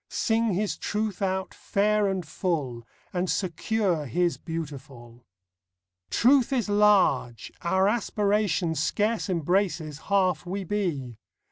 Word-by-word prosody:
Sing 225 -3 +1
His 205 +2 -1
Truth 210 -2 -2
out 190 -1 -1
fair 210 +1 +1
and 190 -3 -2
full, 145 -9 -3 0.3
And 180 0 -1
secure 185 -3 -1
His 175 +8 +1
beautiful. 135 -7 -8 0.8
Truth 260 +1 +4
is 245 -6 0
large. 205 - +3
Our 190 +3 +2
aspiration 205 -5 +1
Scarce 210 +8 0
embraces 170 -3 0
half 185 -5 +2
we 190 +3 -4
be. 160 - -3
185 Hz, 110 wpm, -26 LUFS, 160-210 Hz, 0.8 s, Truth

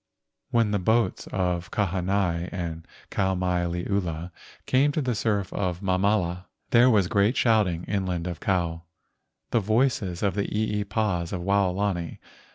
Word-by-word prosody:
When 115 -3 +2
the 105 - +1
boats 110 +1 +1
of 90 -2 -1
Kahanai 95 -3 0
and 85 -3 -5 0.2
Kau 95 -1 +1
mai 90 -1 0
liula 85 -1 -2 0.3
came 135 +3 +3
to - - 0
the 130 -4 0
surf 105 -3 -1
of 90 -3 -2
Mamala, 95 -2 +1 0.3
there 120 +2 +6
was 105 -6 +3
great 100 +6 +2
shouting 105 -8 +2
inland 95 -4 -2
of 85 -3 -4
Kou, 85 -4 -1 0.7
the 115 - +3
voices 110 -4 0
of 100 -3 +2
the 100 +1 -1
eepas 105 -4 -1
of 90 - -3
Waolani. 95 -2 0
95 Hz, 140 wpm, -26 LUFS, 90-105 Hz, 0.7 s, there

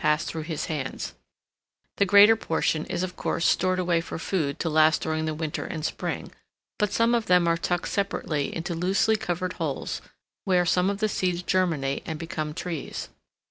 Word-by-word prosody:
pass 150 +1 +2
through 160 - -4
his 155 -1 -3
hands: 150 -5 -4 0.8
the 200 - +3
greater 205 +3 +8
portion 160 -6 0
is 180 -1 -2
of 180 -1 -4
course 170 - -1
stored 185 0 +3
away 175 -2 +1
for 165 - -6
food 165 -4 -1
to - - -2
last 155 0 +4
during 155 0 -1
the 155 - -1
winter 155 -1 -3
and 155 -2 -4
spring, - - -3 0.5
but 210 -2 +1
some 230 +1 +3
of 230 -2 +1
them 180 -1 +4
are 165 - +3
tucked 175 +1 -1
separately 160 -7 -1
into 170 +1 -3
loosely 190 +6 +2
covered 180 -3 -2
holes, - - -2 0.4
where 180 -3 +3
some 180 +2 +3
of 200 +1 -3
the 215 - +3
seeds 180 -3 -1
germinate 160 -8 0
and 160 -2 -4
become 160 -2 -4
trees. 165 -1 -5
175 Hz, 180 wpm, -26 LUFS, 155-185 Hz, 0.8 s, greater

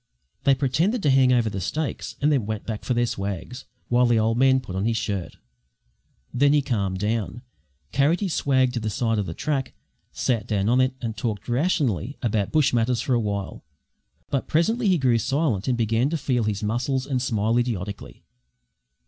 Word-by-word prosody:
They 140 -1 +5
pretended 160 - 0
to 145 - +4
hand 130 -1 +5
over 120 -3 +3
the 100 -2 -3
stakes, 155 - -3
and 150 +2 +2
then 130 -8 +1
went 110 -1 -4
back 110 -2 -5
for 125 - -1
their 120 0 +2
swags, 100 +4 -5 0.2
while 125 0 +3
the 120 -1 +3
old 110 +1 +2
man 130 +1 +4
put 110 -8 -8
on 95 +2 -1
his 115 0 +1
shirt. 95 -7 -3 1.0
Then 140 +3 +4
he 145 -1 +3
calmed 100 -8 -1
down, 110 +4 -2 0.5
carried 140 +7 +2
his 195 -5 -2
swag 130 -3 +2
to 120 - -1
the 110 -1 -2
side 115 0 0
of 100 - -2
the 80 - -5
track, 140 -4 -2 0.4
sat 120 -4 -1
down 100 -1 0
on 125 +2 +4
it 130 0 +1
and 115 -3 -3
talked 110 -1 -4
rationally 130 - 0
about 110 -4 0
bush 155 -5 +3
matters 120 0 +1
for 130 - 0
a 120 - +3
while; 100 -3 -4 0.7
but 135 - -1
presently 215 +9 +1
he 185 -2 +4
grew 125 -5 +2
silent 135 - 0
and 125 -2 +1
began 115 +3 +1
to 165 - -1
feel 125 -5 0
his 105 -1 -2
muscles 125 +5 -1
and 135 -3 -1
smile 115 -1 +1
idiotically. 105 -5 -4
120 Hz, 195 wpm, -24 LUFS, 110-135 Hz, 1.0 s, They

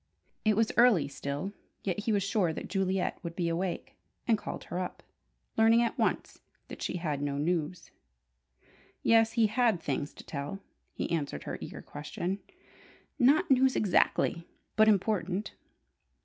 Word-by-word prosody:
It 215 -1 +3
was 225 -1 +3
early 230 - +6
still, 145 +7 -4 0.3
yet 200 +2 -2
he 230 - +2
was 200 -2 +2
sure 195 -4 +1
that - - -6
Juliet 190 -1 0
would 170 -2 -6
be 175 -1 0
awake, 175 +2 -2 0.3
and 230 - +5
called - - -6
her 180 - -4
up, 180 - -5 0.5
learning 225 +1 +6
at 235 - -1
once - - -1 0.3
that - - -8
she - - -2
had 150 -5 -2
no 140 -1 -1
news. 170 +2 -1 1.1
Yes, 225 0 +5
he 230 -2 +4
had 220 -2 +2
things 145 -2 -2
to - - -11
tell, 145 +5 -4 0.4
he - - -3
answered 145 - -2
her - - -5
eager - - -7
question. 175 +6 -4 0.8
"Not 275 +4 +4
news 265 0 +5
exactly, 175 -3 +2 0.3
but 215 0 +6
important." 200 -2 +1
190 Hz, 150 wpm, -30 LUFS, 165-220 Hz, 1.1 s, early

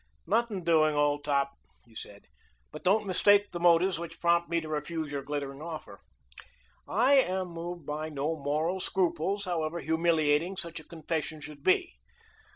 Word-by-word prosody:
"Nothing 215 -1 0
doing, 155 -2 +3
old 145 0 +1
top," 140 -1 +1 0.3
he 115 - -22
said. 100 -2 -10 0.5
"But - - -10
don't 205 +4 +3
mistake 205 +2 +4
the 175 - -5
motives 175 +1 +4
which 165 -1 -8
prompt 170 0 +2
me 170 0 +1
to 160 - -8
refuse 155 0 -3
your 140 -1 -3
glittering 140 0 -5
offer. 155 - -8 0.9
I 245 +8 +3
am 185 -6 -1
moved 170 -1 -7
by 155 +2 -4
no 150 +2 -2
moral 155 +5 -1
scruples, 190 +2 -1
however 170 -2 -2
humiliating 160 +1 +1
such 170 -3 -2
a - - -13
confession 160 -1 -4
should 150 -1 -10
be. 185 - +2
165 Hz, 160 wpm, -29 LUFS, 150-180 Hz, 0.9 s, mistake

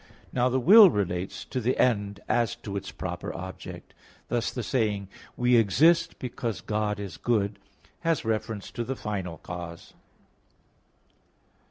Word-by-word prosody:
Now 125 0 +2
the 130 +1 +1
will 200 - +9
relates 95 - -2
to 130 - -3
the 125 +3 0
end 105 -4 +1
as 120 -2 +1
to 100 -2 -4
its 100 0 -4
proper 90 -3 -5
object. 95 +2 -8 0.4
Thus 120 -1 0
the 120 - -4
saying, 105 -5 0 0.3
"we 125 0 +4
exist 165 - +4
because 120 -3 -4
God 105 -1 -1
is 100 -2 -6
good" 105 -4 0 0.4
has 165 -6 0
reference 110 -2 -2
to 120 - -3
the 130 +3 -3
final 95 -8 -4
cause. 85 +1 -8
110 Hz, 140 wpm, -27 LUFS, 100-125 Hz, 0.4 s, will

